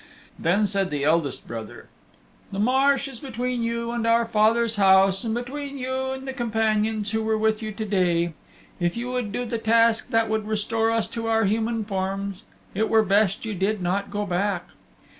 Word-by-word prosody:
Then 200 Hz, +6 st, +2 dB
said 195 Hz, -1 st, 0 dB
the 145 Hz, -3 st, -2 dB
eldest 155 Hz, -1 st, +1 dB
brother, 115 Hz, -1 st, -8 dB, 0.6 s
"The 195 Hz, -, -5 dB
marsh 270 Hz, +5 st, +3 dB
is 265 Hz, -4 st, -8 dB
between 250 Hz, -1 st, -3 dB
you 235 Hz, 0 st, -2 dB
and 235 Hz, -1 st, -2 dB
our 230 Hz, 0 st, +4 dB
father's 225 Hz, 0 st, +2 dB
house, 195 Hz, -1 st, +5 dB
and 225 Hz, -1 st, -1 dB
between 280 Hz, +3 st, -5 dB
you 260 Hz, 0 st, -2 dB
and 265 Hz, 0 st, -5 dB
the 265 Hz, -, -3 dB
companions 220 Hz, -3 st, 0 dB
who 220 Hz, 0 st, 0 dB
were 220 Hz, 0 st, 0 dB
with 220 Hz, 0 st, +1 dB
you 215 Hz, -1 st, -4 dB
to 220 Hz, +1 st, -4 dB
day. 175 Hz, -4 st, +1 dB, 0.5 s
If 175 Hz, +3 st, 0 dB
you 245 Hz, +1 st, -3 dB
would 250 Hz, -5 st, -2 dB
do 245 Hz, +4 st, -2 dB
the 230 Hz, -1 st, -3 dB
task 230 Hz, 0 st, +3 dB
that 225 Hz, 0 st, +2 dB
would 220 Hz, -1 st, -1 dB
restore 225 Hz, +1 st, 0 dB
us 225 Hz, -1 st, +1 dB
to 230 Hz, -1 st, -4 dB
our 225 Hz, 0 st, +2 dB
human 220 Hz, +2 st, 0 dB
forms, 195 Hz, -1 st, -3 dB, 0.3 s
it 220 Hz, +3 st, 0 dB
were 220 Hz, -1 st, +4 dB
best 200 Hz, +1 st, +2 dB
you 220 Hz, -, -3 dB
did 200 Hz, +3 st, 0 dB
not 195 Hz, +3 st, -1 dB
go 205 Hz, 0 st, -2 dB
back. 190 Hz, 0 st, -1 dB
220 Hz, 190 wpm, -24 LUFS, 200-230 Hz, 0.6 s, house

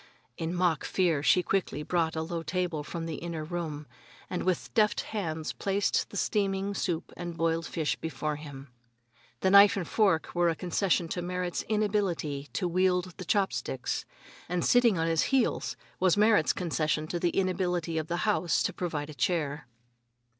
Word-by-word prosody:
In 165 Hz, +2 st, -3 dB
mock 175 Hz, -4 st, +1 dB
fear 170 Hz, -6 st, +1 dB
she 180 Hz, +4 st, +4 dB
quickly 175 Hz, -6 st, -1 dB
brought 165 Hz, -1 st, 0 dB
a 160 Hz, -, -1 dB
low 165 Hz, 0 st, -3 dB
table 170 Hz, -2 st, -2 dB
from 165 Hz, +2 st, -5 dB
an 165 Hz, -, -4 dB
inner 170 Hz, -2 st, -4 dB
room, 155 Hz, -3 st, -4 dB, 0.5 s
and 180 Hz, -, -1 dB
with 185 Hz, -2 st, -1 dB
deft 210 Hz, -1 st, +3 dB
hands 160 Hz, -7 st, -3 dB
placed 200 Hz, +1 st, 0 dB
the 200 Hz, -, -7 dB
steaming 195 Hz, -1 st, 0 dB
soup 175 Hz, -4 st, -2 dB
and 175 Hz, -1 st, -6 dB
broiled 165 Hz, 0 st, 0 dB
fish 155 Hz, -5 st, -1 dB
before 155 Hz, -2 st, -3 dB
him. 140 Hz, -2 st, -10 dB, 0.7 s
The 190 Hz, -, +3 dB
knife 200 Hz, +1 st, +8 dB
and 180 Hz, -, -3 dB
fork 195 Hz, -7 st, +2 dB
were 175 Hz, -1 st, +3 dB
a 165 Hz, -, 0 dB
concession 180 Hz, 0 st, 0 dB
to 180 Hz, -, -2 dB
Merrit's 180 Hz, 0 st, -2 dB
inability 195 Hz, -10 st, 0 dB
to 180 Hz, -, 0 dB
wield 180 Hz, 0 st, +1 dB
the 185 Hz, -, -7 dB
chopsticks, 135 Hz, -, -1 dB, 0.5 s
and 175 Hz, -1 st, 0 dB
sitting 240 Hz, -5 st, +4 dB
on 165 Hz, -, +1 dB
his 165 Hz, -1 st, +2 dB
heels 265 Hz, -3 st, +1 dB, 0.2 s
was 185 Hz, 0 st, +3 dB
Merrit's 210 Hz, -6 st, +4 dB
concession 155 Hz, -3 st, -1 dB
to 175 Hz, +2 st, -3 dB
the 175 Hz, -, +2 dB
inability 180 Hz, -3 st, 0 dB
of 155 Hz, -, -4 dB
the 175 Hz, -, -1 dB
house 180 Hz, -5 st, +2 dB
to -, -, -1 dB
provide 155 Hz, -4 st, -3 dB
a -, -, -9 dB
chair. 150 Hz, -3 st, -1 dB
175 Hz, 170 wpm, -29 LUFS, 160-190 Hz, 0.7 s, knife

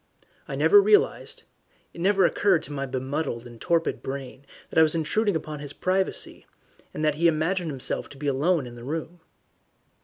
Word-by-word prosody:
I -, -, -4 dB
never 410 Hz, 0 st, +6 dB
realized 415 Hz, 0 st, +2 dB, 0.5 s
it 170 Hz, -, -8 dB
never 195 Hz, 0 st, +4 dB
occurred 185 Hz, -1 st, +2 dB
to -, -, -8 dB
my 140 Hz, -1 st, -3 dB
bemuddled 130 Hz, -1 st, -3 dB
and 120 Hz, -2 st, -12 dB
torpid 165 Hz, -9 st, 0 dB
brain 135 Hz, 0 st, -7 dB, 0.2 s
that -, -, +3 dB
I -, -, +8 dB
was 160 Hz, 0 st, +4 dB
intruding 200 Hz, +5 st, +1 dB
upon 155 Hz, -1 st, -4 dB
his 145 Hz, -1 st, -7 dB
privacy, 190 Hz, +3 st, -2 dB, 0.4 s
that 155 Hz, -1 st, 0 dB
he 165 Hz, +3 st, +2 dB
imagined 165 Hz, +2 st, 0 dB
himself 135 Hz, -3 st, -3 dB
to 140 Hz, -, -13 dB
be 145 Hz, -, -7 dB
alone 145 Hz, +3 st, +1 dB
in 120 Hz, -, -9 dB
the 120 Hz, 0 st, -11 dB
room. 160 Hz, +5 st, -5 dB
155 Hz, 175 wpm, -26 LUFS, 135-175 Hz, 0.5 s, I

